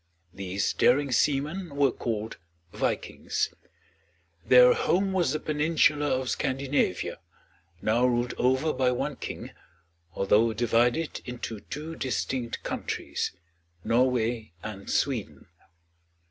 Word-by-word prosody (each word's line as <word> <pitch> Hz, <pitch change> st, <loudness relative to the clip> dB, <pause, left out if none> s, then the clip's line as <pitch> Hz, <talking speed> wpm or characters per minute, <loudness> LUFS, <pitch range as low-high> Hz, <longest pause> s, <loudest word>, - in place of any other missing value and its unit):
These 95 Hz, 0 st, -2 dB
daring 140 Hz, +2 st, +3 dB
seamen 150 Hz, +5 st, 0 dB
were 140 Hz, -2 st, +3 dB
called 110 Hz, -2 st, -4 dB, 0.4 s
Vikings. -, -, -2 dB, 0.9 s
Their 125 Hz, +4 st, +7 dB
home 190 Hz, +2 st, +1 dB
was 175 Hz, -8 st, +2 dB
the 155 Hz, -, -1 dB
peninsula 150 Hz, -1 st, +2 dB
of 130 Hz, -2 st, 0 dB
Scandinavia, 135 Hz, -8 st, -1 dB, 0.6 s
now 120 Hz, +4 st, +3 dB
ruled 120 Hz, 0 st, 0 dB
over 130 Hz, +5 st, +2 dB
by 130 Hz, -1 st, +2 dB
one 125 Hz, -, -2 dB
king, -, -, -6 dB, 0.6 s
although 105 Hz, +4 st, +3 dB
divided 120 Hz, +7 st, +1 dB
into 120 Hz, -3 st, -5 dB
two 155 Hz, +8 st, -7 dB
distinct 130 Hz, -3 st, -3 dB
countries, -, -, -3 dB, 0.5 s
Norway 120 Hz, -3 st, +1 dB
and 100 Hz, -2 st, -7 dB
Sweden. 110 Hz, -, -1 dB
125 Hz, 105 wpm, -27 LUFS, 115-145 Hz, 0.9 s, Their